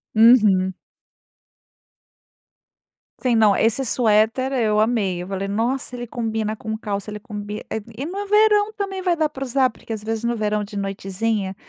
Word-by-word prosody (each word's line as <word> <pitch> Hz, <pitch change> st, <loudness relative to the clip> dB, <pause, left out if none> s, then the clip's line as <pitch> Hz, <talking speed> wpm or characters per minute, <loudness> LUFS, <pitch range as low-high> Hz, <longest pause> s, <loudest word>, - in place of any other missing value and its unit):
Uhum. 210 Hz, -5 st, +5 dB, 2.5 s
Sim, 250 Hz, -3 st, +2 dB
não, 215 Hz, -2 st, +5 dB
esse 225 Hz, +4 st, +2 dB
suéter, 230 Hz, +2 st, +2 dB
eu 215 Hz, -4 st, +2 dB
amei, 215 Hz, -6 st, +1 dB
eu -, -, -9 dB
falei: 195 Hz, 0 st, -3 dB
"Nossa, 235 Hz, +6 st, -1 dB
ele 240 Hz, -1 st, -5 dB
combina 220 Hz, -2 st, -2 dB
com 220 Hz, 0 st, -5 dB
calça, 205 Hz, -1 st, -4 dB
ele 210 Hz, -, -6 dB
combi", 210 Hz, 0 st, -6 dB
eh, 220 Hz, -, -3 dB, 0.2 s
e 270 Hz, -, -3 dB
no 390 Hz, +5 st, -4 dB
verão 420 Hz, 0 st, +4 dB
também 395 Hz, -3 st, -4 dB
vai 360 Hz, -1 st, +2 dB
dar 315 Hz, -, +2 dB
para 270 Hz, -2 st, -7 dB
usar, 260 Hz, 0 st, +2 dB
porque 225 Hz, -, -13 dB
às 220 Hz, -2 st, -3 dB
vezes 220 Hz, +1 st, -3 dB
no 235 Hz, 0 st, 0 dB
verão, 210 Hz, -1 st, 0 dB
de 205 Hz, 0 st, -8 dB
noitezinha, 195 Hz, +1 st, -2 dB
225 Hz, 165 wpm, -22 LUFS, 210-255 Hz, 2.5 s, Uhum